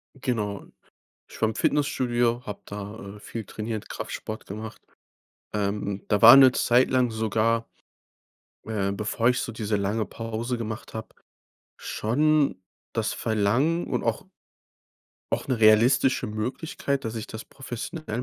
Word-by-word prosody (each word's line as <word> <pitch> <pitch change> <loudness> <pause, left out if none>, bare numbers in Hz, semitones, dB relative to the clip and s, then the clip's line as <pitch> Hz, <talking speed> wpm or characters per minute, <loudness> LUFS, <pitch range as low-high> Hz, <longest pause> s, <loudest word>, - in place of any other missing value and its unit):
Genau. 110 -7 -2 0.6
Ich - - -13
war 110 - +3
im 110 - -3
Fitnessstudio, 120 -3 +1
hab 105 -1 -8
da, 100 0 -7
äh, - - -14
viel 115 +1 -6
trainiert, 110 +1 -5
Kraftsport 110 0 -6
gemacht. 110 +2 -8 0.7
Ähm, 100 -1 -2
da 105 -2 +1
war 115 +4 +12
'ne 135 -1 +9
Zeit 125 +1 +3
lang 125 -2 +2
sogar 110 +1 0 1.0
äh, 100 -3 -1
bevor 105 +3 0
ich 125 - 0
so 115 - -4
diese 110 -1 -1
lange 105 +2 0
Pause 115 +3 -4
gemacht 110 0 -6
hab, 110 0 -7 0.6
schon 145 0 +1 0.3
das - - -1
Verlangen 115 +11 +1
und - - -1
auch - - -1 1.1
auch - - -1
'ne 130 -3 0
realistische 115 +5 +5
Möglichkeit, 135 +5 -3
dass 110 - -3
ich 110 -2 -5
das 110 0 -8
professionell 130 -1 -6
110 Hz, 135 wpm, -26 LUFS, 105-125 Hz, 1.1 s, war